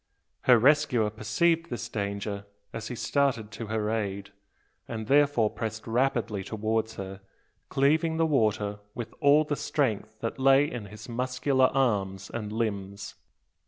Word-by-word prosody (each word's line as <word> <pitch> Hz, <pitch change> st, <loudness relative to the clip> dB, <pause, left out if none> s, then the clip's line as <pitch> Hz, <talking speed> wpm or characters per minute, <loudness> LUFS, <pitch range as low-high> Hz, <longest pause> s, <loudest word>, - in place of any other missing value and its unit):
Her 125 Hz, -2 st, +7 dB
rescuer 130 Hz, -4 st, +3 dB
perceived 160 Hz, +11 st, +1 dB
this 120 Hz, -1 st, -4 dB
danger 100 Hz, -2 st, -4 dB, 0.3 s
as 115 Hz, -1 st, -5 dB
he 125 Hz, -, -5 dB
started 125 Hz, -5 st, 0 dB
to 115 Hz, +1 st, -6 dB
her 110 Hz, 0 st, -1 dB
aid; 100 Hz, -3 st, -3 dB, 0.6 s
and 110 Hz, -2 st, -5 dB
therefore 140 Hz, -4 st, +3 dB
pressed 110 Hz, -1 st, -5 dB
rapidly 115 Hz, -4 st, 0 dB
towards 110 Hz, +2 st, -2 dB
her, 95 Hz, 0 st, -7 dB, 0.5 s
cleaving 160 Hz, +4 st, +2 dB
the 165 Hz, -, +3 dB
water 105 Hz, -8 st, +1 dB, 0.2 s
with 120 Hz, -, -6 dB
all 145 Hz, +1 st, +5 dB
the 150 Hz, -1 st, -2 dB
strength 110 Hz, -7 st, -1 dB
that 115 Hz, +3 st, -3 dB
lay 135 Hz, +1 st, +5 dB
in 120 Hz, -7 st, -5 dB
his 105 Hz, +2 st, -11 dB
muscular 130 Hz, +2 st, +1 dB
arm 105 Hz, -8 st, +1 dB, 0.2 s
and 105 Hz, -3 st, -4 dB
limbs. 100 Hz, -3 st, -3 dB
115 Hz, 140 wpm, -28 LUFS, 105-135 Hz, 0.6 s, Her